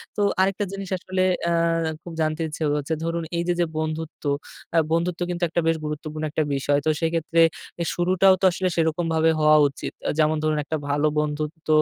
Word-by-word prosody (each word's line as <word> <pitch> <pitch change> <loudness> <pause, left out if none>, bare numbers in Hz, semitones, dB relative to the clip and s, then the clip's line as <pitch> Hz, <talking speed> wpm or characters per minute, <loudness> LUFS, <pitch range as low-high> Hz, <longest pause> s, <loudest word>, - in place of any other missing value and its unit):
তো - - -1 0.2
আরেকটা 195 +2 +1
জিনিস 195 -1 -6
আসলে 185 +1 -1 0.2
অ্যা 165 -1 +1
খুব 170 - -8
জানতে 155 +1 0
ইচ্ছে 155 +1 -5
হচ্ছে 150 +2 -2
ধরুন 165 0 -2
এইযে 170 +1 +1
যে 175 - +3
বন্ধুত্ব, 155 0 -4 0.5
অ্যা 165 - +4
বন্ধুত্ব 170 +1 0
কিন্তু 175 0 -3
একটা 170 +2 0
বেশ 165 0 +2
গুরুত্বপূর্ণ 155 +1 -5
একটা 155 - +1
বিষয়। 145 +1 +1
তো - - +3
সেইক্ষেত্রে 165 0 +1 0.4
এর 170 - -1
শুরুটাও 185 +2 +4
তো - - +3
আসলে 185 +1 -1
সেরকমভাবে 160 0 +1
হওয়া 155 0 +6
উচিত। 140 - -6 0.2
আ - - +1
যেমন 155 0 +3
ধরুন 155 -1 +1
একটা 155 +2 -2
ভালো 145 +1 +2
বন্ধুত্ব 150 +2 -3
165 Hz, 185 wpm, -24 LUFS, 155-170 Hz, 0.5 s, হওয়া